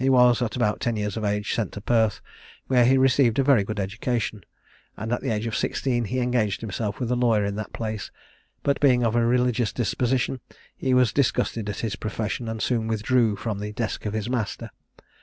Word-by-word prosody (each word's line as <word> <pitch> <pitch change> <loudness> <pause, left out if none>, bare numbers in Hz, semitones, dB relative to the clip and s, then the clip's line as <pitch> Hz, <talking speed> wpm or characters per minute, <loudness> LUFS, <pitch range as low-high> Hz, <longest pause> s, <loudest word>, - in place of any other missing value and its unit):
He 135 - +3
was, 125 -2 +5
at 115 -3 -1
about 110 -4 0
ten 120 -1 -1
years 105 -2 -2
of 110 - -4
age, 105 0 -1
sent 110 -5 -2
to - - -6
Perth, 110 -1 +1 0.4
where 125 -2 +4
he 130 +2 +5
received 130 -3 +3
a 135 - +4
very 130 -6 +4
good 105 +1 -4
education; 110 +1 -2 0.5
and 110 +3 -3
at - - -1
the 135 - -2
age 110 0 -1
of 115 - -2
sixteen 120 -4 0
he 115 +6 -3
engaged 120 -5 0
himself 110 -1 -3
with 125 -2 -2
a - - +2
lawyer 115 -4 +2
in 100 - -2
that 110 - -5
place; 110 -3 -4 0.5
but 140 - +1
being 125 -4 +4
of 115 -1 +1
a 120 - +3
religious 125 -1 +2
disposition, 125 +3 0 0.4
he 130 -1 0
was 125 -4 +3
disgusted 115 -5 0
at 105 - -4
his 110 -3 -2
profession, 110 +2 -3
and 110 -1 -3
soon 115 -3 0
withdrew 115 0 +2
from 105 0 -4
the 105 +1 -5
desk 110 -1 -3
of 105 - -3
his 110 0 -2
master. 120 -5 -3
115 Hz, 215 wpm, -25 LUFS, 105-125 Hz, 0.5 s, was